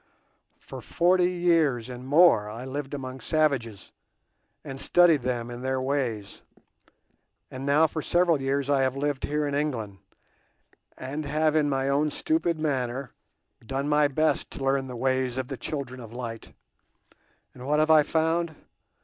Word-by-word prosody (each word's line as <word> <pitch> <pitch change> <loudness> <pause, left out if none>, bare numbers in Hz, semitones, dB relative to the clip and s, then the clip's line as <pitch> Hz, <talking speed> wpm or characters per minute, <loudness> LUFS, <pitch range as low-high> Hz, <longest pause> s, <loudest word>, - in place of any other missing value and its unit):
For - - -10
forty 180 +1 +2
years 165 -9 +1
and 125 0 -8
more 145 -8 +5
I 115 +4 -7
lived 140 +1 -5
among 130 -1 -7
savages, 135 - -1 0.7
and 135 0 -7
studied 175 -4 +4
them 120 -1 -3
and 120 +1 -8
their 130 0 -1
ways; 130 -7 -3 1.1
and 130 +2 -6
now 150 +3 +5
for 155 0 -3
several 170 -2 +2
years 135 +1 -1
I 140 -1 +2
have 130 0 0
lived 145 -1 -1
here 150 0 -1
in 145 - -3
England, 120 -10 -2 1.0
and 140 +4 -5
have 155 +2 +1
in 150 -2 +2
my 135 -1 0
own 145 +2 +2
stupid 175 - 0
manner 135 -4 -2 0.5
done 135 +4 -3
my 150 0 +3
best 155 +3 0
to 135 - -7
learn 135 0 +1
the 125 - -7
ways 130 0 0
of 130 -1 -3
the 135 - -4
children 130 0 -5
of 115 -3 -10
light; 115 -2 -7 1.0
and 125 0 -10
what 150 +1 +2
have 155 +1 +3
I 155 -1 +7
found? 160 +2 0
140 Hz, 160 wpm, -26 LUFS, 130-155 Hz, 1.1 s, I